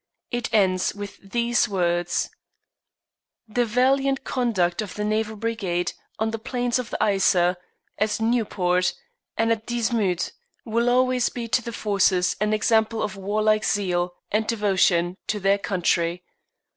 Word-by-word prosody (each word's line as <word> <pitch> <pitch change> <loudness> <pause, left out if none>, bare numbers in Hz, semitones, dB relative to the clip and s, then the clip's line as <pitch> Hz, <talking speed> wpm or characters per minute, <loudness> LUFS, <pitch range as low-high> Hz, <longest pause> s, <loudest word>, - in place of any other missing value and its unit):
It 240 -1 -2
ends 190 -4 +2
with 205 0 -8
these 235 +4 0
words: 175 -2 0 1.2
"The 240 +3 +1
valiant 270 +4 +2
conduct 210 -8 0
of 210 - -6
the 210 - -3
Naval 215 +1 -1
Brigade 205 -6 -2 0.2
on 220 0 0
the 225 - -4
plains 245 0 -1
of 250 - -5
the - - -3
Yser, 185 -3 +3 0.4
at 215 0 +1
Nieuport, 200 -6 +1 0.4
and 225 0 +2
at 225 -1 -1
Dixmude 225 -6 0 0.3
will 235 +1 +1
always 255 0 +3
be 235 -2 -5
to 250 - +2
the 235 - -6
Forces 195 -4 +1
an 210 0 +2
example 220 +1 +2
of 200 - -3
warlike 215 +2 +1
zeal 180 -3 0 0.2
and 215 +1 +1
devotion 190 -5 +2
to 210 - -1
their 200 +1 +2
country. 175 -2 0
215 Hz, 140 wpm, -24 LUFS, 185-230 Hz, 1.2 s, Yser